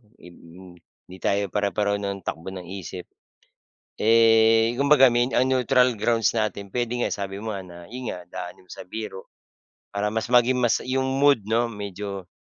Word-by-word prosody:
ib 90 - -15
m 90 +1 -15 0.3
hindi 95 - -10
tayo 100 0 0
pare-pareho 100 0 0
ng 100 -1 -4
takbo 80 +1 -5
ng 90 -1 -7
isip. 95 -1 -7 1.0
Eh, 115 0 +5
kumbaga 140 0 +6
ang 120 +1 +2
neutral 125 -1 +3
grounds 115 +1 +1
natin 110 -2 -2
puwede 120 -1 -1
nga, - - +1
sabi 100 -1 -5
mo 110 0 -4
nga 95 - -6
na 90 -1 -12
'yon 125 +1 -5
nga, - - -6
daanin 90 0 -9
mo - - -15
sa - - -9
biro 105 -1 -8 0.6
para 105 +1 0
mas 110 +2 -2
maging 125 +1 +4
mas 120 -2 +2
yung 130 +1 -1
mood 145 -2 +5
'no, 115 +2 +1
medyo 100 -2 -6
110 Hz, 170 wpm, -24 LUFS, 95-120 Hz, 1.0 s, kumbaga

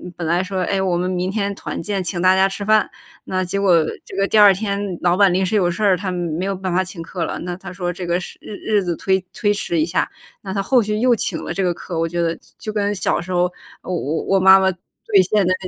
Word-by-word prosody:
本 170 - -5
来 175 +3 +2
说： 190 0 -3
“哎， 195 - +1
我 185 -2 +1
们 180 +1 -1
明 185 0 -1
天 200 -1 -1
团 - - -5
建 195 +2 -2
请 175 -1 -3
大 185 +1 +5
家 190 0 +4
吃 195 +1 -5
饭。” 215 +1 +3 0.4
那 185 0 -1
结 185 +2 -2
果 180 -5 +4 0.2
这 - - -10
个 195 +1 +1
第 220 - +1
2 205 -2 +8
天 200 -2 -3
老 175 0 +2
板 195 -2 +5
临 190 +2 +1
时 190 +3 0
有 180 -4 +2
事 175 - -6
儿， 195 -3 +4
他 185 0 -3
没 175 -1 -2
有 195 0 -1
办 185 0 -4
法 185 +1 +2
请 185 -2 -8
客 170 +1 -4
了。 - - -4
那 175 0 -4
他 185 0 -9
说 180 -1 -3
这 180 +1 -6
个 175 +1 0
时 185 - -9
日 210 - -9 0.2
日 200 - +2
子 175 -2 -2
推 190 +2 0
推 205 -2 +1
迟 175 -5 -2
一 155 - +3
下， 170 +2 -1 0.3
那 190 -1 -6
他 200 - 0
后 245 +5 +3
续 210 0 -2
又 245 +1 +4
请 - - -3
了 - - -4
这 195 - -1
个 180 -1 +1
客， 170 0 -7
我 165 - +1
觉 175 +1 -2
得 165 -1 0
就 - - -20 0.2
就 215 -2 -6
跟 205 -1 0
小 185 - 0
时 180 +2 -8
候 180 0 +1 0.3
我 185 - -4 0.3
我 195 - +2
妈 190 +1 +8
妈 190 0 +2
兑 190 +3 0
现 210 -3 +3
的 185 - +3
190 Hz, 295 characters per minute, -20 LUFS, 175-200 Hz, 0.4 s, 2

